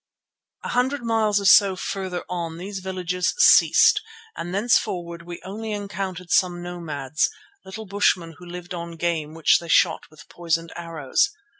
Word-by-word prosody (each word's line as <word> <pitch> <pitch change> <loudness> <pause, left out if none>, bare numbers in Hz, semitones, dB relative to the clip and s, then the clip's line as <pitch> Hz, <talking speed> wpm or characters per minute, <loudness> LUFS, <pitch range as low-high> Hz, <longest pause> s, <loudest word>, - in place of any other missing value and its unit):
A - - -5
hundred 260 +2 0
miles 220 -3 +1
or 200 - -5
so 195 -1 +6
farther 185 -1 -4
on 170 -2 -4
these 195 +3 -6
villages 180 -1 -2
ceased 430 -3 +6 0.3
and 175 - -5
thenceforward 180 -5 0
we 170 0 -9
only 215 +3 -5
encountered 195 -4 -5
some 180 -2 +2
nomads, 155 -5 -2 0.4
little 215 +3 -8
bushmen 185 -4 0
who 180 - -12
lived 180 +1 -8
on 170 -1 -6
game 160 -2 -2
which 165 - +4
they 170 - -10
shot - - +2
with 155 - -16
poisoned 165 -1 -2
arrows. 165 -6 0
180 Hz, 150 wpm, -23 LUFS, 170-200 Hz, 0.4 s, so